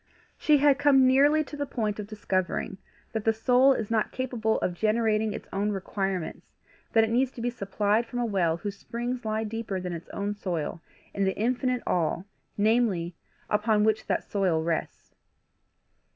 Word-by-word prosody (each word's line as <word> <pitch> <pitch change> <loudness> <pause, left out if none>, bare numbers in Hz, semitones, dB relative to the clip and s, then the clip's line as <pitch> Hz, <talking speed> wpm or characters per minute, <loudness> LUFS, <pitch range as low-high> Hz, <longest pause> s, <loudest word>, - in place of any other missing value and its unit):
She 300 -2 +4
had 285 -1 +4
come 280 -2 +5
nearly 285 +4 +5
to 295 - -9
the 285 -1 -3
point 215 -4 -2
of 205 - -5
discovering 190 -2 -2 0.3
that 220 -2 -2
the 225 - +4
soul 250 +4 +4
is 225 -4 -4
not 220 -2 +1
capable 240 -4 -1
of 180 - 0
generating 215 +2 +1
its - - -7
own 205 +2 0
requirements, 195 -2 -3 0.5
that 225 - +6
it 220 - 0
needs 255 +2 +2
to - - -10
be 240 +1 -1
supplied 210 +1 0
from 245 - -6
a 245 - +1
well 180 -7 +1
whose 200 +3 -5
springs 240 +3 -4
lie 220 0 -1
deeper 220 -3 -3
than 180 -1 -4
its 170 0 -8
own 205 +1 -3
soil, 170 -5 -4 0.3
in 200 - 0
the 190 0 0
infinite 250 +2 0
All, 175 +1 0 0.3
namely, 205 -5 +2 0.3
upon 210 0 +2
which 220 0 +1
that - - 0
soil 180 -6 0
rests. 165 -1 -3
215 Hz, 175 wpm, -27 LUFS, 195-245 Hz, 0.5 s, that